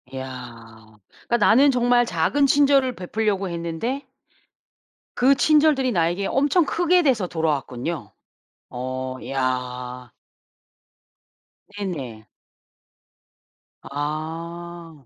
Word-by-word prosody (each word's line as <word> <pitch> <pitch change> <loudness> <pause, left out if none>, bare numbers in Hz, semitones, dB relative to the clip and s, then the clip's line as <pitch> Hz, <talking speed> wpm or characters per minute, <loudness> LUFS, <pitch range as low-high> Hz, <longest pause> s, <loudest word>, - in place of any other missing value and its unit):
야 115 -4 -10 0.3
그러니까 235 - +2
나는 240 +6 +5
정말 245 -1 +3
작은 235 - +1
친절을 275 -3 +3
베풀려고 200 0 -1
했는데 170 - -3 1.1
그 270 +3 +5
친절들이 295 -3 +3
나에게 175 +1 0
엄청 290 +5 +2
크게 350 +3 +2
돼서 240 - +2
돌아왔군요. 150 -6 -3 0.6
어 130 +1 -5
이야. 125 -2 -3 1.7
네네. 135 - -5 1.6
아. 165 +1 -6
170 Hz, 185 characters per minute, -23 LUFS, -, 1.7 s, 나는